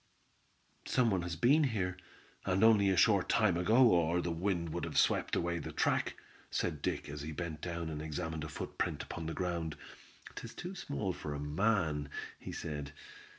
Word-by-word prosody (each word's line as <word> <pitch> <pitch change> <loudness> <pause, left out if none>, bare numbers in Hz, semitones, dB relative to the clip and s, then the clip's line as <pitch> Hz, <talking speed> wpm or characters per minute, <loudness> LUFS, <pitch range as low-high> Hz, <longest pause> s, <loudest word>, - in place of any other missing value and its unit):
"Some 125 -3 +3
one 95 -2 +1
has 85 -1 -3
been 135 - +4
here, 95 -8 -1 0.5
and 95 +3 +1
only 105 -3 +6
a 95 - +2
short 100 -2 +4
time 110 -6 +4
ago, 110 +9 +5
or 85 0 +3
the 85 -1 -1
wind 85 0 -1
would - - -3
have - - -3
swept - - +3
away 85 0 0
the - - -6
track," - - +1 0.3
said - - -1
Dick, - - -2
as 75 0 -6
he 75 +2 -5
bent 80 -1 -5
down 85 -1 -3
and 75 -1 -4
examined 80 0 -3
a 80 - -5
footprint - - -3
upon 80 - -6
the 80 - -3
ground. 85 -4 -2 0.6
"'Tis 115 - -8
too 180 +2 -6
small 125 - -3
for 75 -3 -5
a - - -4
man," 75 -1 +1 0.3
he - - -7
said. 75 -2 -5
85 Hz, 185 wpm, -33 LUFS, 80-100 Hz, 0.6 s, only